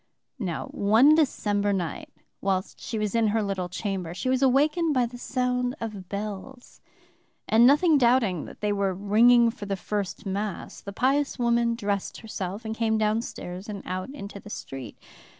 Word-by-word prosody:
"Now 180 -7 -3
one 225 +9 +5
December 205 -9 +1
night, 180 -5 -3 0.3
whilst 190 -1 -1
she 225 - -4
was 210 -2 -1
in 230 -1 +3
her 215 +1 +1
little 190 -3 -2
chamber, 185 -2 -4
she 255 - -2
was 260 0 +2
awakened 295 +4 +3
by 250 -1 +3
the 240 +1 -8
sound 250 0 -1
of 205 -5 -6
bells, 210 +5 -7 0.7
and 230 +2 +6
nothing 295 +2 +5
doubting 235 - +2
that - - -12
they 210 -1 +1
were 200 -2 0
ringing 230 +4 +5
for 210 -3 -9
the 195 - -1
first 205 +2 -4
Mass, 200 0 -4
the 200 - -7
pious 275 +6 +1
woman 235 -1 +2
dressed 205 -4 -2
herself, 205 -1 -6
and 220 - -2
came 225 -1 +1
downstairs 210 -3 -2
and 200 -2 -6
out 185 +3 -4
into 205 -8 -8
the 210 - -12
street. 135 - -7
215 Hz, 170 wpm, -26 LUFS, 195-245 Hz, 0.7 s, and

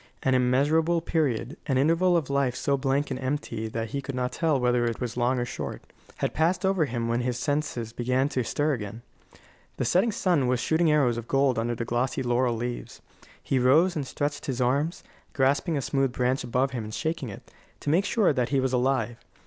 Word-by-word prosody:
An 130 - +2
immeasurable 145 +7 +3
period, 145 -6 -1
an 135 -3 +1
interval 165 +6 +3
of 155 -5 -2
life 140 -3 0
so 140 - +1
blank 140 +1 0
and 130 - -3
empty 130 -4 -3
that 115 0 -4
he 140 +4 -3
could 135 0 -6
not 125 0 -1
tell 160 -5 +1
whether 125 -1 +2
it 115 -1 -1
was 125 -2 -4
long 125 +1 +1
or 120 - 0
short, - - -6 0.3
had - - -1
passed 170 +5 +1
over 190 -4 +2
him 120 -3 -3
when 115 +1 0
his 125 0 -1
senses 130 -5 -2
began 125 +3 +1
to 130 -3 -1
stir 145 +6 0
again. 115 -1 -6 0.7
The - - -1
setting 200 +6 +3
sun 180 - +1
was 125 -1 +1
shooting 160 +6 +2
arrows 135 -6 +3
of 120 0 -6
gold 135 -3 +2
under 120 +1 -1
the 115 - -4
glossy 120 +3 -1
laurel 120 0 +1
leaves. 120 +1 -5 0.4
He 135 - +1
rose 155 +9 +4
and 145 -4 -3
stretched 145 +1 -3
his 130 -3 -2
arms, 140 +7 0 0.3
grasping 145 +4 +1
a 140 - -2
smooth 135 -2 0
branch 125 +2 0
above 125 +2 0
him 120 -4 -4
and 110 0 -8
shaking 160 -6 -2
it, 100 - -11 0.3
to 145 - -1
make 180 +5 +3
sure 200 -6 +2
that 125 -3 0
he 140 - +2
was 130 -1 0
alive. 125 -2 +1
130 Hz, 210 wpm, -26 LUFS, 120-150 Hz, 0.7 s, rose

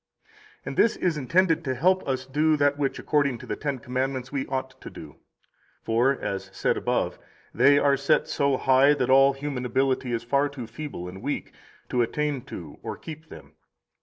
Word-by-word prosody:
2 - - -36 0.4
And - - -7
this 230 - +4
is 175 -3 0
intended 165 +4 +2
to 130 -4 -2
help 185 +8 +3
us 130 -1 -2
do 150 +3 +2
that 145 0 +3
which 140 -2 -1
according 140 -4 +1
to - - -11
the - - -3
Ten 140 -2 -3
Commandments 130 +1 -3
we 140 -2 -2
ought 130 -1 -4
to - - -8
do. - - -12 0.7
For 120 +4 +2
(as 95 0 -4
said - - 0
above) - - -1 0.3
they 140 0 +5
are 140 -1 +4
set 140 +1 +1
so 140 -1 +1
high 135 +3 +4
that 130 -2 0
all 135 +1 +6
human 135 -2 -4
ability 130 0 0
is 115 -1 -2
far 140 +4 +1
too 135 -4 -7
feeble 115 -6 -7
and 95 +2 -9
weak 140 +4 -4 0.4
to 125 - +1
[attain 145 +3 -1
to 80 - -9
or] - - -6
keep 155 0 -10
them. - - -13
135 Hz, 195 wpm, -25 LUFS, 125-145 Hz, 0.7 s, all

